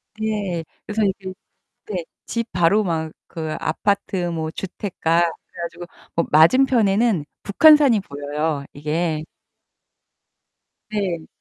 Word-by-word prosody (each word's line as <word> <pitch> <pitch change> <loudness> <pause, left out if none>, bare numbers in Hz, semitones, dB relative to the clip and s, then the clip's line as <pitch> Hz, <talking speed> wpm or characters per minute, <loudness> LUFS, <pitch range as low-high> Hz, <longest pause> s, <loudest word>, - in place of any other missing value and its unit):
네. 210 -6 -2 0.2
그래서 215 +1 -1
이제 190 -1 -2 0.5
네 185 -5 -3 0.2
집 230 -1 -3
바로 180 +5 +3
막 160 -3 -2 0.2
그 160 -2 -4
아파트 190 +1 0
뭐 160 -2 -3
주택가 175 -2 -1
그래 170 0 -4
가지고 170 +1 -6 0.3
뭐 170 - +3
맞은편에는 215 - +4 0.2
북한산이 280 0 +6
보여요, 145 -1 -3
이게. 155 +2 -1 1.7
네. 185 -6 -2
175 Hz, 210 characters per minute, -22 LUFS, 160-210 Hz, 1.7 s, 북한산이